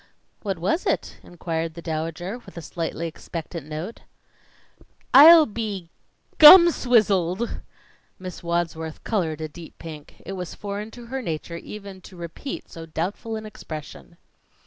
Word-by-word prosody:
"What 195 Hz, -4 st, -3 dB
was 190 Hz, -, -1 dB
it?" -, -, -1 dB
inquired 165 Hz, -2 st, -4 dB
the 170 Hz, -, -8 dB
Dowager, 165 Hz, +6 st, -4 dB
with 240 Hz, -, -15 dB
a -, -, -5 dB
slightly 165 Hz, 0 st, -4 dB
expectant 165 Hz, -1 st, -7 dB
note. 155 Hz, +8 st, -6 dB, 1.1 s
"I'll 315 Hz, +3 st, +10 dB
be 205 Hz, -, -5 dB, 0.5 s
gum 340 Hz, +3 st, +11 dB
swizzled!" 215 Hz, -, +1 dB, 0.6 s
Miss 185 Hz, -1 st, -8 dB
Wadsworth 170 Hz, -2 st, -3 dB
colored 165 Hz, -8 st, -1 dB
a 155 Hz, -, -3 dB
deep 160 Hz, +2 st, -12 dB
pink. 155 Hz, -3 st, -10 dB
It 195 Hz, -, -5 dB
was 180 Hz, -2 st, -6 dB
foreign 205 Hz, +1 st, -5 dB
to 240 Hz, +1 st, -12 dB
her 265 Hz, +3 st, -4 dB
nature 170 Hz, -3 st, -4 dB
even 200 Hz, +1 st, -9 dB
to 185 Hz, -, -14 dB
repeat 170 Hz, -, -7 dB
so 165 Hz, -1 st, -10 dB
doubtful 185 Hz, +8 st, -3 dB
an 220 Hz, 0 st, -6 dB
expression. 170 Hz, -4 st, -9 dB
175 Hz, 140 wpm, -24 LUFS, 165-215 Hz, 1.1 s, gum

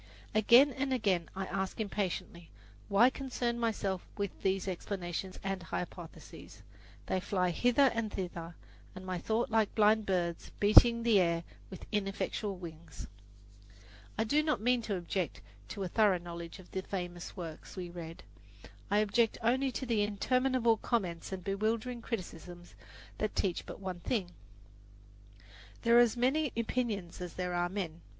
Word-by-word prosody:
Again 235 Hz, +6 st, +7 dB
and 270 Hz, +1 st, -2 dB
again 200 Hz, -9 st, +1 dB
I 190 Hz, 0 st, -2 dB
ask 190 Hz, +2 st, -3 dB
impatiently, 185 Hz, -5 st, -3 dB, 0.4 s
"Why 220 Hz, +6 st, +6 dB
concern 245 Hz, -3 st, -2 dB
myself 200 Hz, -5 st, -1 dB
with 200 Hz, -2 st, -1 dB
these 190 Hz, 0 st, 0 dB
explanations 185 Hz, 0 st, -4 dB
and 195 Hz, -1 st, -2 dB
hypotheses?" 170 Hz, 0 st, -7 dB, 0.4 s
They 190 Hz, -, 0 dB
fly 180 Hz, -1 st, 0 dB
hither 245 Hz, -, +4 dB
and 230 Hz, -2 st, -2 dB
thither 170 Hz, -3 st, -5 dB, 0.4 s
in 185 Hz, 0 st, -8 dB
my 185 Hz, -1 st, -2 dB
thought 225 Hz, +5 st, 0 dB
like 220 Hz, -2 st, +2 dB
blind 215 Hz, 0 st, +4 dB
birds 175 Hz, -3 st, -1 dB
beating 235 Hz, +3 st, +7 dB
the 225 Hz, -4 st, +5 dB
air 170 Hz, -2 st, +2 dB, 0.3 s
with 190 Hz, -, -9 dB
ineffectual 200 Hz, 0 st, -1 dB
wings. 170 Hz, -2 st, -9 dB, 1.1 s
I 220 Hz, -, +2 dB
do 290 Hz, +7 st, +3 dB
not 305 Hz, -4 st, 0 dB
mean 245 Hz, +2 st, +2 dB
to 215 Hz, -3 st, -2 dB
object 175 Hz, -2 st, -2 dB, 0.3 s
to 195 Hz, -, -5 dB
a -, -, -1 dB
thorough 205 Hz, 0 st, +4 dB
knowledge 170 Hz, 0 st, -7 dB
of 185 Hz, -2 st, -15 dB
the 190 Hz, -, -2 dB
famous 175 Hz, -1 st, -5 dB
works 165 Hz, -3 st, -7 dB
we 180 Hz, -2 st, -4 dB
read. 165 Hz, -1 st, -8 dB, 0.7 s
I 205 Hz, -, +3 dB
object 220 Hz, +2 st, +2 dB
only 260 Hz, +3 st, +2 dB
to 265 Hz, -, -3 dB
the 230 Hz, -4 st, +1 dB
interminable 235 Hz, +3 st, +2 dB
comments 190 Hz, -9 st, -2 dB
and 190 Hz, -2 st, -5 dB
bewildering 220 Hz, +5 st, -1 dB
criticisms 175 Hz, -5 st, -6 dB, 0.5 s
that 215 Hz, -, -1 dB
teach 185 Hz, -4 st, -1 dB
but -, -, -7 dB
one 185 Hz, -2 st, -5 dB
thing: 185 Hz, -2 st, -1 dB, 1.5 s
there 235 Hz, 0 st, +6 dB
are 240 Hz, 0 st, +8 dB
as 230 Hz, -, -7 dB
many 270 Hz, +4 st, +2 dB
opinions 220 Hz, -7 st, -2 dB
as 180 Hz, -2 st, -6 dB
there 180 Hz, -1 st, -2 dB
are 175 Hz, 0 st, +1 dB
men. 175 Hz, -4 st, -4 dB
200 Hz, 150 wpm, -32 LUFS, 180-230 Hz, 1.5 s, are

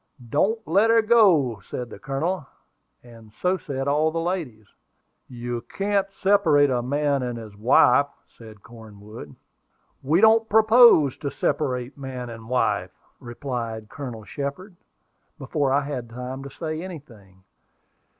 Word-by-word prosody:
"Don't 220 Hz, +9 st, 0 dB
let 200 Hz, +7 st, +3 dB
her 225 Hz, 0 st, +4 dB
go," 180 Hz, -, +4 dB
said 125 Hz, -1 st, -6 dB
the -, -, -10 dB
Colonel; 140 Hz, +4 st, -3 dB, 0.6 s
and 115 Hz, -3 st, -16 dB
so 180 Hz, +1 st, +1 dB
said 140 Hz, -6 st, -5 dB
all 150 Hz, +2 st, +2 dB
the 165 Hz, +1 st, -3 dB
ladies. 165 Hz, -, -4 dB, 0.6 s
"You 120 Hz, -1 st, -5 dB, 0.2 s
can't 200 Hz, 0 st, +1 dB, 0.2 s
separate 165 Hz, -8 st, +4 dB
man 140 Hz, +1 st, 0 dB
and 115 Hz, -4 st, -6 dB
wife," 125 Hz, +4 st, +4 dB, 0.3 s
said 110 Hz, -3 st, -14 dB
Cornwood. 105 Hz, -7 st, -12 dB, 0.7 s
"We 155 Hz, +6 st, +2 dB
don't 220 Hz, +1 st, +4 dB
propose 220 Hz, -, +6 dB
to 140 Hz, -, -4 dB
separate 130 Hz, -2 st, -2 dB
man 130 Hz, -3 st, -6 dB
and 115 Hz, 0 st, -11 dB
wife," 125 Hz, 0 st, 0 dB, 0.3 s
replied 120 Hz, -3 st, -6 dB
Colonel 125 Hz, -6 st, -8 dB
Shepard, 145 Hz, -, -6 dB, 0.6 s
before 140 Hz, -1 st, -1 dB
I 140 Hz, +2 st, +3 dB
had 135 Hz, -5 st, -5 dB
time 125 Hz, +3 st, -7 dB
to -, -, -7 dB
say 155 Hz, +2 st, -5 dB
anything. 115 Hz, -, -12 dB
140 Hz, 130 wpm, -24 LUFS, 120-170 Hz, 0.7 s, propose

